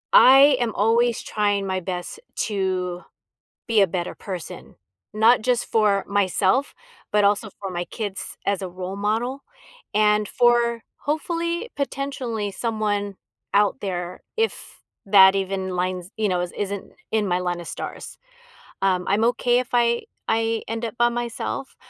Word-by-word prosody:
I 275 - +8
am 235 -3 0
always 230 +3 +2
trying 205 -2 0
my 190 -1 -1
best 180 - -5 0.3
to 185 -3 -2 0.6
be 225 -2 +3
a 195 - +6
better 175 0 -3
person. 185 -4 -8 0.4
Not 225 +3 +5
just 245 +1 +1
for 210 -3 +2
myself, 200 +5 +1 0.4
but 210 -1 +3
also 205 +2 +2
for 195 -2 -5
my 175 -1 -3
kids 205 -4 -5
as 200 -1 0
a 190 - -4
role 185 +2 -6
model 230 +7 -1 0.5
and 210 0 +3
for, 240 -1 +2 0.2
hopefully, 335 +7 -2
potentially, 260 -7 -3
someone 205 -2 -2 0.4
out 205 +5 +3
there 180 -2 -4 0.2
if 450 0 -3 0.2
that 195 -1 +7
even 190 -1 -2
lines 180 0 -2
you 215 -1 +1
know, 180 -2 0
i 180 - -3
isn't 200 -1 -4 0.2
in 220 -2 +1
my 180 -1 +1
line 175 -1 -2
of 170 - -9
stars. - - -7 0.6
Um, 185 -2 +1
I'm 205 +3 +2
okay 245 0 +2
if 255 +1 -4
I 235 -1 +3 0.3
I 225 0 0
end 225 +1 -4
up 225 - -5
by 240 0 +5
myself, 240 +3 -4
210 Hz, 150 wpm, -23 LUFS, 190-240 Hz, 0.6 s, I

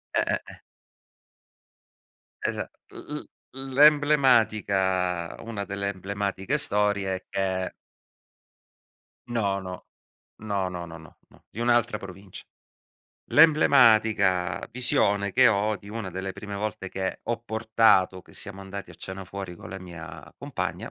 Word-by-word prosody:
Eh-eh, - - +1
eh - - -12 1.9
Esat - - -2 0.2
l 150 - -7
l - - -8 0.5
l'emblematica, 110 - +3
una 110 -3 -5
delle 100 0 -3
emblematiche 100 +5 -2
storie 100 -4 +1
e 95 - -9
che 95 -1 -2 1.6
No, 100 -5 0
no. 90 -1 -8 0.6
No, 100 -3 -2
no, 90 -1 -6
no, 80 -1 -9
no, 80 -1 -16
no. - - -22
Di 110 - -10
un'altra 120 -2 +2
provincia. 95 -1 -10 0.9
L'emblematica 110 - +5
visione 100 -5 +2
che 130 0 +6
ho 105 0 +1
di 100 - -14
una 110 -3 -5
delle 95 +1 -4
prime 100 +1 -8
volte 100 -1 -4
che 95 0 -4
ho 120 -2 -1
portato, 110 -5 +2
che - - -19
siamo 100 0 -5
andati 95 -1 -7
a - - -12
cena 95 +3 -7
fuori 95 -2 -7
con - - -11
la 95 - -6
mia 80 -4 -10
compagna, - - -4
100 Hz, 125 wpm, -26 LUFS, 95-110 Hz, 1.9 s, che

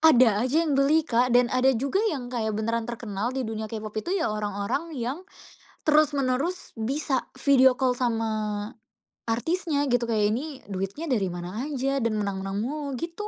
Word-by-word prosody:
Ada 250 -7 +5
aja 320 +6 +2
yang 305 - 0
beli, 285 +3 +4
Kak, 245 -3 +2
dan 245 -1 +3
ada 255 +1 +4
juga 275 - 0
yang 255 -8 -4
kayak 220 -3 -1
beneran 230 +2 -1
terkenal 225 -2 -3
di 260 - -1
dunia 220 0 -4
K-pop 215 -1 -6
itu 365 - -1
ya 315 - 0
orang-orang 210 +10 -3
yang 255 +8 -3 0.7
terus-menerus 300 +2 +1
bisa 260 +3 -1 0.2
video 265 -2 +6
call 255 -2 +2
sama 225 -3 0 1.0
artisnya, 290 +5 0
gitu. 245 -1 +2
Kayak 210 -2 +2
ini 275 +2 -5
duitnya 195 - -3
dari 205 -7 +2
mana 180 +9 -5
aja 275 -1 -1
dan 230 -2 0
menang-menang 195 -1 -2
mulu, 285 +1 -3
gitu. 335 - -5
250 Hz, 165 wpm, -26 LUFS, 220-290 Hz, 1.0 s, video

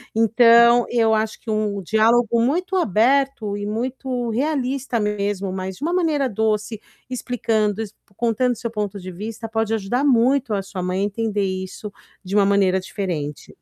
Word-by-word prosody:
Então, 235 +1 +6
eu 225 -2 +2
acho 220 0 -1
que 225 - -5
um 210 -2 -1
diálogo 230 +3 +3
muito 355 +10 0
aberto 240 - +1
e 205 - -4
muito 245 +2 -3
realista 260 -1 -1
mesmo, 205 -2 -2
mas 190 0 -4
de 280 - -10
uma 340 +2 0
maneira 310 -7 +1
doce, 215 0 -1 0.3
explicando, 225 -4 -1 0.3
contando 240 +1 +1
seu 230 +1 -5
ponto 210 -2 -3
de 185 -1 -8
vista 220 +4 -7
pode 225 0 -1
ajudar 225 +6 -1
muito 250 -1 +3
a 200 - 0
sua 190 -1 -6
mãe 185 +1 -1
a - - +1
entender 210 0 -1
isso 190 +2 -5 0.3
de 190 +1 -4
uma 200 - +5
maneira 195 -2 +3
diferente. 175 -7 -5
220 Hz, 160 wpm, -21 LUFS, 200-245 Hz, 0.3 s, Então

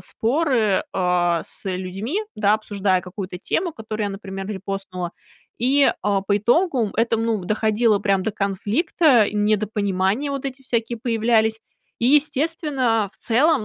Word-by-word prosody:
споры, 230 - +1
а, 175 -2 +1
с - - -6
людьми, 195 - -3 0.2
да, 210 0 +3
обсуждая 200 -3 0
какую-то 185 0 -7
тему, 330 - -1
которую 220 -2 -4
я, - - -3
например, 195 0 -7
репостнула. 190 -3 -5 0.5
И, 270 +4 +4
а, 200 -1 +1
по 200 +1 +1
итогу 240 - +2
это, 230 0 +2
м, 225 - -1
ну, 220 -5 -1
доходило 215 +1 +2
прям 195 -2 +1
до 220 - -1
конфликта, 215 - +2
недопонимания 210 +3 0
вот 275 -1 -4
эти 270 0 -5
всякие 235 -2 -2
появлялись. 225 -1 +1 0.4
И, 235 - +1
естественно, 285 -5 +2
а, - - -12
в - - -21
целом, 260 +1 +2
215 Hz, 145 wpm, -22 LUFS, 195-245 Hz, 0.5 s, И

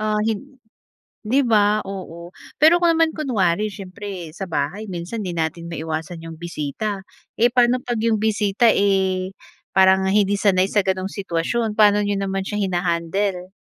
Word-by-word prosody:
ah, 215 0 0
hin 260 +5 -4 0.7
'di 255 +6 +3
ba, 215 -4 +3
oo. 175 -3 -8 0.3
Pero 320 +3 +7
kung 345 -1 +3
naman 325 0 +3
kunwari 215 - 0
siyempre, 190 -3 -7
sa 185 +5 -6
bahay 165 +6 -3
minsan 190 +3 -5
'di 180 - -3
natin 165 0 -3
maiwasan 160 0 -5
'yong 165 -1 -9
bisita, 175 +5 -4 0.3
eh, 240 +2 +3
paano 245 +1 +3
'pag 240 -2 -3
'yong 220 -1 +1
bisita, 215 +1 +2
eh, 190 -2 +1 0.4
parang 190 0 +5
hindi 200 0 +2
sanay 195 -2 +2
sa 205 -3 +1
gano'ng 190 0 -1
sitwasyon, 200 +4 -2
paano 210 -1 +4
niyo 205 - 0
naman 195 0 -2
siya 210 0 -3
hina-handle? 180 +1 -1
195 Hz, 155 wpm, -21 LUFS, 180-215 Hz, 0.7 s, Pero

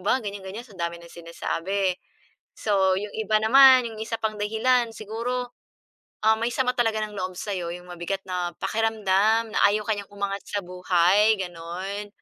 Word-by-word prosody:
ba, 230 +6 +2
ganiyan-ganiyan 205 +1 -7
sa 205 - -17
dami 170 -1 -3
ng 170 - -14
sinasabi. 175 +3 -2 0.6
So, 190 -3 +2
yung 205 +1 -4
iba 215 -1 0
naman, 260 +1 +8
yung 215 - -9
isa 225 +1 -3
pang 215 -2 -3
dahilan, 230 +3 +2
siguro, 240 +3 -4 0.7
ah, 220 0 +5
may 230 - +1
sama 250 0 +1
talaga 225 -3 +1
ng 210 - -8
loob 185 0 -3
sa'yo, 180 -4 -4
yung 180 0 -14
mabigat 185 +3 -4
na 180 -1 -2
pakiramdam 220 0 +1
na - - 0
ayaw 210 0 -1
ka 220 - 0
niyang 200 -1 -8
umangat 200 0 -3
sa 205 - -2
buhay, 180 +4 +3
gano'n. 185 +4 -5
205 Hz, 165 wpm, -25 LUFS, 185-220 Hz, 0.7 s, naman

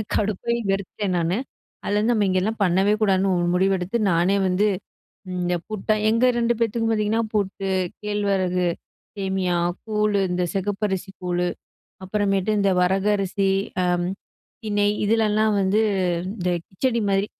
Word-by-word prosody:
எனக்கு - - -47
கடுப்பாகி 215 +3 -1
வெறுத்துட்டேன் 195 0 -2
நானு. 170 +2 0 0.5
அதுலேருந்து 210 +3 +1
நம்ம 210 - +2
இங்கெல்லாம் 190 +4 0
பண்ணவே 190 +3 +3
கூடாதுன்னு 195 -2 +2
ஒரு 175 0 +1
முடிவெடுத்து, 190 +2 +1
நானே 175 +3 +2
வந்து 185 +3 +2 0.7
இந்த 180 0 0
புட்டா 215 0 0
எங்க 230 +3 +3
2 235 0 +2
பேத்துக்கும் 225 0 0
பார்த்தீங்கன்னா 215 +1 +1
புட்டு, 195 -1 -1 0.3
கேழ்வரகு 195 -3 0 0.5
சேமியா, 190 -2 -1 0.3
கூழ், 210 -1 +1
இந்த 180 0 0
செகப்பரிசி 195 -1 -2
கூழு 180 0 0 0.6
அப்புறமேட்டு 195 0 0
இந்த 200 -1 +3
வரகு 190 +3 +2
அரிசி, 195 0 0 0.3
அம் 175 0 +1 0.6
திணை 205 -1 +1 0.2
இதுலலாம் 215 0 +2
வந்து 195 +3 +2 0.5
இந்த 180 -4 -2 0.2
கிச்சடி 235 +5 -1
மாதிரி 195 +1 +2
195 Hz, 130 wpm, -23 LUFS, 185-210 Hz, 0.7 s, பண்ணவே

